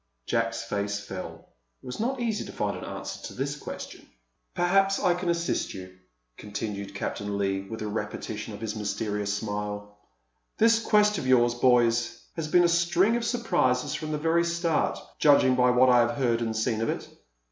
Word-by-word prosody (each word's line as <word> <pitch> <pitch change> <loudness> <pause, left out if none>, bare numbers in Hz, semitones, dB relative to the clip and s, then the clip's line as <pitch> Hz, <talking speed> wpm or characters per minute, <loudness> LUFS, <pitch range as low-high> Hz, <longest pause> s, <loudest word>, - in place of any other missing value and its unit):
Jack's 115 0 -1
face 100 -2 -2
fell.. 95 -2 -8 0.3
It - - -15
was 125 - -6
not 255 +4 -1
easy 230 -3 -1
to - - -8
find - - -2
an - - -7
answer - - -6
to - - -11
this 140 +2 -2
question. 145 - -8 0.5
"Perhaps 195 +2 +3
I 180 - +3
can 180 0 -3
assist 170 0 -1
you," 95 -1 -9 0.4
continued 100 -1 -5
Captain 100 0 -3
Leigh, 95 -1 0
with 110 -1 -5
a - - -3
repetition 105 +1 -4
of 100 - -11
his 110 -1 -3
mysterious 105 -1 -2
smile. 105 0 -4 0.6
"This 225 +1 +4
quest 210 -3 +3
of 130 - -4
yours, 120 -2 +4
boys, 120 -1 +2 0.2
has 160 -2 -3
been 175 +3 +5
a - - +5
string 170 +5 +3
of 240 - -1
surprises 175 - +1
from 155 -1 -4
the 150 - -1
very 165 +2 +2
start, 170 -2 0 0.2
judging 140 -3 +5
by 125 0 +4
what 125 +1 +5
I 125 - +6
have 120 +2 +1
heard 120 -4 +1
and 110 -1 -2
seen 110 0 0
of 115 - 0
it. - - -3
125 Hz, 185 wpm, -27 LUFS, 105-170 Hz, 0.6 s, I